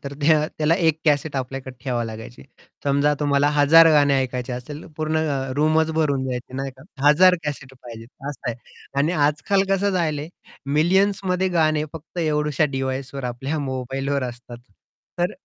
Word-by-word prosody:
तर 140 - -5 0.5
त्याला 155 +1 +3
1 160 -4 +2
कॅसेट 145 -1 +1
आपल्याकडे 130 0 -5
ठेवाव 125 -3 -1
लागायची. 115 +2 -8 0.4
समजा 140 +1 +2
तुम्हाला 145 -1 +2
1000 160 +3 +7
गाणे 145 -2 +4
ऐकायची 125 -1 -3
असेल 145 +5 -7
पूर्ण 155 0 -1
अ, 140 -4 -2
रूमच 155 +2 +2
भरून 145 -4 0
जायची 125 0 -5
नाही 135 0 -3
का? - - -14 0.3
1000 180 +5 +6
कॅसेट 135 -3 -5
पाहिजेत 115 -1 -10 0.2
असं 145 -5 -6
आहे. 115 - -6 0.4
आणि 150 +5 +2
आजकाल 160 +6 +1
कसं 195 +1 +2
झाल 165 -5 0
आहे, 150 +2 -6 0.5
मिलियन्समध्ये 190 +2 +2
गाणे 155 -1 +2
फक्त 160 +2 -10
एवढूश्या 150 -2 +1
डिव्हाइसवर 135 0 -4
आपल्या 135 +5 -3
मोबाईलवर 135 +2 -2
असतात. 120 -1 -7 0.6
तर 175 +1 +1
145 Hz, 150 wpm, -22 LUFS, 130-160 Hz, 0.6 s, 1000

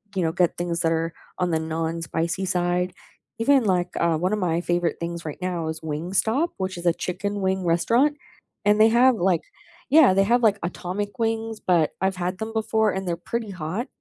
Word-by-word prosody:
you 185 - +1
know, 160 - +1
get 175 0 +1
things 170 -1 -2
that 165 -1 +2
are 165 0 -1 0.3
on 180 - +1
the 160 - +2
non-spicy 165 +3 -2
side, 180 0 0 0.5
even 270 +2 +4
like, 180 -3 +1
uh, 170 -2 +2
one 185 +4 0
of - - +1
my 170 -2 0
favorite 175 -1 0
things 170 0 -5
right 155 +2 -6
now 175 -3 -2
is 160 0 -4
Wingstop, 185 - 0
which 190 -1 -3
is 175 - -8
a 170 - +4
chicken 200 +4 -3
wing 190 -1 0
restaurant, 235 - +2 0.5
and 210 +1 +4
they 220 - +7
have, 245 +2 +5
like, 180 -4 +1 0.5
yeah, 285 -8 +7
they 195 +1 +4
have, 240 +3 +2
like, 210 -2 +4
atomic 185 +3 -4
wings, 225 -1 -1
but 170 -4 +2
I've 190 -1 0
had 180 +1 -2
them 220 0 -4
before 220 -1 +1
and 190 -1 -4
they're 170 -1 -1
pretty 230 +4 -4
hot. 185 - -4
185 Hz, 200 wpm, -24 LUFS, 170-215 Hz, 0.5 s, they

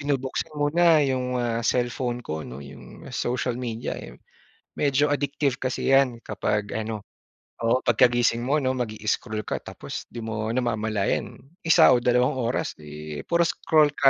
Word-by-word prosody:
binubuksan 140 0 -2
muna 160 +2 +4
'yong, 130 -2 0
ah, 120 -1 0
cellphone 120 0 0
ko, 80 0 -4
'no, 65 +3 -8
'yong 70 - -12
social 125 0 -1
media, 120 -2 -4
eh. - - -9 0.6
Medyo 145 +1 +2
addictive 140 -2 -1
kasi 130 0 -1
'yan 130 -3 +4
kapag 105 -1 -1
ano, 110 -1 -4 0.6
oo, 120 +3 +3
pagkagising 120 0 +3
mo, 145 +3 +2
'no, 130 -1 +1
mag-i-scroll 110 -1 -2
ka - - -2
tapos - - -7
'di 120 - -5
mo 110 -1 -3
namamalayan 110 -5 0 0.3
1 165 - +7
o - - +5
2 125 +3 +2
oras, 120 -1 -1
eh, 75 -1 -8
puro 170 0 +2
scroll 155 -2 +3
ka 135 - +7
120 Hz, 150 wpm, -25 LUFS, 110-135 Hz, 0.6 s, 1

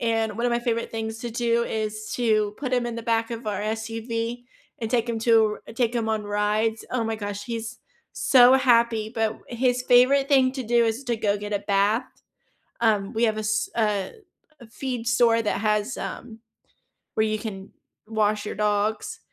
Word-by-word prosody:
and 225 -2 0
one 235 +1 0
of 240 - +1
my 235 - +2
favorite 230 -1 -2
things 225 0 -4
to 240 -1 -5
do 235 0 +1
is 215 0 -4
to 215 -3 +1
put 260 -3 -4
him 245 -1 +1
in 240 - -4
the 230 - -5
back 225 0 0
of 230 -1 -6
our 205 -1 -2
SUV 225 +2 -3 0.4
and 225 -1 -3
take 240 -1 +1
him 230 -1 -1
to 220 -2 +3
r - - -10
take 235 0 0
him 230 -2 -1
on 220 -1 -1
rides. 210 +2 0
Oh 245 -3 -1
my 225 0 -2
gosh, 205 -1 -5
he's 230 0 -5 0.3
so 255 -1 +6
happy, 235 -4 +3
but 225 -2 +1
w - - -24
his 250 +1 0
favorite 260 +3 +4
thing 260 -2 +4
to 265 -1 -4
do 235 +1 +3
is 230 +4 -2
to 240 -2 -1
go 205 -2 0
get 205 +1 -6
a 205 - +1
bath. 205 +4 +1 0.8
Um, 210 -4 +1
we 225 - -1
have 220 -2 +1
a 215 - -2
s 215 0 0
a 210 -4 0 0.5
a 235 - -12
feed 245 -1 -5
store 235 -1 +4
that 210 - -1
has, 210 +3 0
um, 225 -2 -7 0.8
where 220 - +2
you 215 0 -1
can 195 -3 -7 0.4
wash 215 -1 0
your - - -4
dogs 210 0 -1
225 Hz, 200 wpm, -24 LUFS, 215-240 Hz, 0.8 s, so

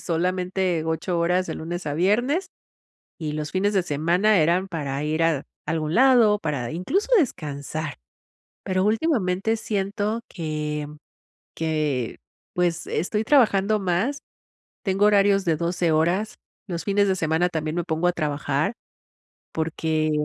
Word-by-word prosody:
solamente 180 0 -1
8 165 +2 -1
horas 180 +2 +1
de - - -4
lunes 175 +2 -5
a 145 - -1
viernes, 240 - +1 0.7
y 155 -2 -3
los 150 0 -4
fines 200 +2 +1
de 190 - +3
semana 175 +7 +2
eran 170 +4 +2
para 145 -5 -3
ir 155 +2 +1
a 155 -4 +1 0.2
algún 160 -1 -1
lado, 240 -5 +5
para, 145 - -3
incluso, 185 - -1
descansar, 155 - -3 0.7
pero 185 0 0
últimamente 220 - +1
siento 210 +1 -2
que, 150 -3 -3 0.7
que, 150 -7 -1 0.4
pues, 175 -1 0
estoy 210 +6 -1
trabajando 215 -5 +3
más, 200 +10 0 0.7
tengo 195 +1 +2
horarios 200 -1 +4
de 165 -3 +2
12 170 0 0
horas 175 +7 +1 0.3
los 170 -2 -4
fines 200 0 +2
de 190 - +1
semana, 165 +1 +1
también 155 -2 -2
me 175 - -1
pongo 165 0 -1
a - - +2
trabajar. 150 +1 -1 0.8
Porque, 160 -1 -1
175 Hz, 135 wpm, -24 LUFS, 155-200 Hz, 0.8 s, lado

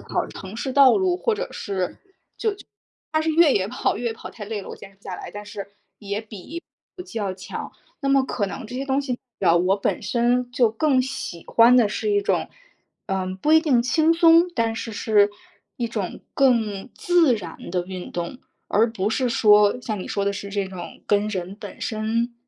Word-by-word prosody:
跑 - - -2
城 190 +3 -9
市 260 +2 -3
道 275 +2 +7
路， 370 -2 +2
或 445 +4 0
者 - - -4
是 190 -3 -2 0.2
就 - - -32 1.0
它 315 - +3
是 320 0 0
越 320 -2 +5
野 195 -5 +1
跑， - - -1
越 240 - -2
野 - - -4
跑 - - -9
太 210 - -9
累 210 -1 -4
了， - - -10
我 - - -6
坚 195 - -12
持 195 - -27
不 - - -41
下 185 -2 -6
来， - - -8
但 205 0 -7
是 205 -1 -7 0.3
也 205 +1 -4
比 220 - -8
跑 - - -41 0.3
步 - - -5
机 240 -10 -8
要 200 -3 -1
强。 185 - -7 0.3
那 275 - +1
么 275 -1 +4
可 215 -5 -2
能 230 +4 -6
这 245 - -7
些 265 - -2
东 270 0 +1
西 255 -3 -3 0.2
啊， 170 -2 +5
我 180 +3 +3
本 - - -1
身 245 +1 +1
就 245 -2 +3
更 265 +3 +2
喜 260 -10 -6
欢 235 +2 +6
的 225 -4 +5
是 420 - -2
一 410 - +3
种 - - 0 0.6
嗯， 185 -1 -2
不 305 +10 +2
一 320 - +8
定 285 -7 +3
轻 310 +6 +3
松， 335 +1 +6
但 230 -2 0
是 225 0 -5
是 205 -1 +3 0.5
一 235 -2 -1
种 210 -5 -4
更 230 -5 +2
自 335 -8 +3
然 175 -6 -8
的 180 0 -1
运 185 -1 -7
动， 175 +9 -4 0.3
而 225 +2 +2
不 195 -3 -1
是 245 +3 0
说， 210 0 +5
像 215 -4 -3
你 - - -6
说 200 - -1
的 200 - +1
是 200 0 -6
这 200 -1 -1
种 180 -2 -9
跟 205 0 +2
人 190 -1 -4
本 - - -9
身 230 +2 -1
225 Hz, 230 characters per minute, -23 LUFS, 200-265 Hz, 1.0 s, 一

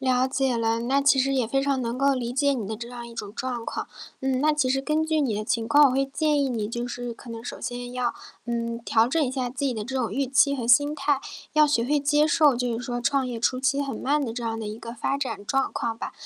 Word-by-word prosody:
了 255 -1 +2
解 265 -2 0
了， 230 0 +1
那 265 +4 +2
其 280 -1 +4
实 270 +1 +2
也 255 -4 +1
非 270 +3 +1
常 275 -1 0
能 235 +1 -3
够 275 +1 +3
理 245 -2 -3
解 280 +2 +2
你 230 -7 -3
的 220 - -3
这 235 +2 -8
样 240 -1 -8
一 235 - -11
种 210 -3 -6
状 245 -1 -4
况。 - - -4 0.3
嗯， 265 -1 0
那 305 +1 +4
其 295 -3 +1
实 270 +1 +1
根 305 +3 0
据 315 -1 +1
你 245 -7 0
的 210 +1 -3
情 225 0 -1
况， 290 +5 +7
我 270 - +4
会 270 +1 +2
建 295 +1 +1
议 270 - 0
你， 220 -4 -2
就 240 +2 -3
是 245 0 -5
可 235 - -13
能 230 0 -7
首 - - -7
先 245 0 -5
要， 250 -2 -1 0.3
嗯， 235 -1 -2
调 230 -1 +3
整 315 +5 +1
一 255 - -1
下 260 -2 -2
自 255 +3 -5
己 270 -2 +1
的 215 -2 -4
这 265 +3 -5
种 250 -4 -1
预 275 +1 0
期 280 +2 +4
和 240 -4 -4
心 285 +5 +5
态， 285 -1 +1 0.3
要 305 0 +6
学 235 -6 +1
会 295 +3 +2
接 295 +1 +3
受 300 -3 +4
就 240 -1 -1
是 245 - -6
说 245 -1 -3
创 270 +2 +1
业 245 -2 -4
初 255 +2 +1
期 275 +2 +1
很 275 -2 -3
慢 290 +2 0
的 225 - -4
这 240 0 -5
样 225 -1 -2
的 220 - -5
一 210 +1 -6
个 230 0 -8
发 245 +3 -1
展 260 -7 -4
状 270 +4 0
况 225 -1 -3
吧， - - -5
255 Hz, 305 characters per minute, -25 LUFS, 235-275 Hz, 0.3 s, 况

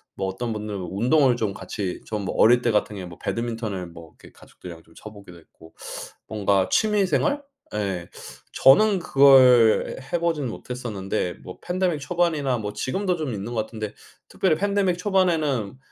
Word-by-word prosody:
뭐 95 - -3
어떤 95 +5 -4
분들은 105 -3 -5
운동을 125 +5 +3
좀 110 -4 -2
같이 95 -2 -5
좀 105 -2 -4
어릴 120 +2 +5
때 120 - +1
같은 105 0 0
경우에는 90 -3 -8
배드민턴을 115 -6 -3
뭐 85 -1 -13
이렇게 - - -16
가족들이랑 85 -2 -13
좀 80 - -23
쳐 110 - -10
보기도 100 -4 -14
했고 80 0 -19 0.5
뭔가 100 -3 +1
취미 210 -2 +2
생활? 285 +9 0 0.3
예 95 -5 -3 0.4
저는 200 +8 +5
그걸 130 -7 +5 0.2
해 175 - +1
보진 165 -6 -1
못했었는데 110 -7 -4
뭐 90 - -10
팬데믹 180 -3 -1
초반이나 155 -6 0
뭐 105 -2 -5
지금도 180 - -1
좀 155 -6 -4
있는 105 +4 -5
것 110 - 0
같은데 110 -1 -6 0.3
특별히 170 -5 +1
팬데믹 200 -2 +1
초반에는 160 - 0
120 Hz, 345 characters per minute, -24 LUFS, 100-160 Hz, 0.5 s, 어릴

